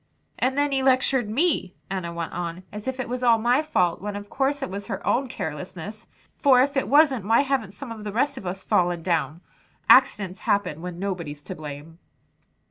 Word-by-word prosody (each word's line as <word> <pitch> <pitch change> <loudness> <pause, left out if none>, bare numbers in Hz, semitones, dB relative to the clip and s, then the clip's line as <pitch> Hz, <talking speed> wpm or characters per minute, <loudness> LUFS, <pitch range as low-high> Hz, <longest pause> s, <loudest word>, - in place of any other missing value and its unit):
"And 260 +2 +1
then 290 0 +2
he 270 -1 +1
lectured 260 -3 +2
me," 250 - +1 0.2
Enna 185 -3 -3
went 170 -1 -5
on, 175 +1 -4
"as 210 +3 -8
if 260 0 -3
it 260 - -2
was 250 +1 -4
all 235 -2 +5
my 240 +5 +3
fault, 180 - 0
when 205 0 -4
of 205 0 -8
course 275 +1 0
it - - -3
was 200 +1 -6
her 200 -5 -5
own 260 +1 +1
carelessness; 175 +5 -6 0.3
for 265 -4 +5
if 280 +3 +2
it 270 - +1
wasn't, 275 -6 +4
why 225 +3 +5
haven't 260 -8 -1
some 250 +2 -8
of 220 -2 -7
the 210 - -4
rest 280 +6 +1
of 200 -8 -7
us 190 +2 -4
fallen 175 -2 +1
down. 165 -2 -1 0.5
Accidents 210 -8 +5
happen 180 -6 0
when 180 -1 -6
nobody's 170 -7 -4
to - - -6
blame." 150 +2 -9
210 Hz, 205 wpm, -24 LUFS, 175-260 Hz, 0.5 s, all